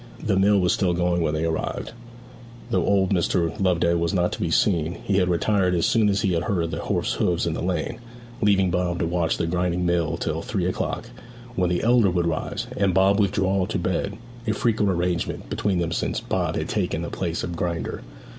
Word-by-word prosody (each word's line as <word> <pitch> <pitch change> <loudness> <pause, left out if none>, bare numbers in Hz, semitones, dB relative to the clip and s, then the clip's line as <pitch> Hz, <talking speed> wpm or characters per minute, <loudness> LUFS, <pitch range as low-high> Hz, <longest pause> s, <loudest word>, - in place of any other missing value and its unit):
The 100 - +1
mill 100 +1 +4
was 90 -1 +2
still 90 -3 +1
going 90 0 +1
when 80 -1 0
they 80 +1 -1
arrived, 80 -1 -3 0.8
though 90 -3 +2
old 95 -1 +2
Mr. 85 -2 +1
Loveday 85 -2 +2
was 85 +3 0
not 90 -1 +1
to - - -5
be 85 - 0
seen; 85 -2 +2
he 100 - +1
had 90 -2 +2
retired 90 +1 +2
as 85 - +1
soon 110 -3 +3
as 100 0 +1
he 95 -3 +2
heard 85 0 0
the - - -3
horse's - - -1
hoofs 85 -1 +1
in 85 - -1
the - - -4
lane, 95 +6 -2 0.4
leaving 95 -4 +3
Bob 90 -1 0
to 85 - 0
watch 85 -1 0
the 85 - -1
grinding 90 +1 0 0.3
till - - -2
three - - -2
o'clock; - - -3 0.4
when 90 -5 +1
the 90 0 0
elder 115 -3 +4
would 90 -1 0
rise, 85 -1 -2
and 95 -3 +1
Bob 95 +2 +4
withdraw 95 -2 +1
to 110 - -2
bed 95 +3 -2 0.3
a 110 - +2
frequent 105 -2 +1
arrangement 90 -1 -2
between 100 -3 0
them 85 -1 -1
since - - -1
Bob - - -2
had - - -2
taken 80 - -1
the 85 - -5
place 85 -3 -3
of 85 - -4
grinder. 85 -1 -3
90 Hz, 205 wpm, -24 LUFS, 85-100 Hz, 0.8 s, mill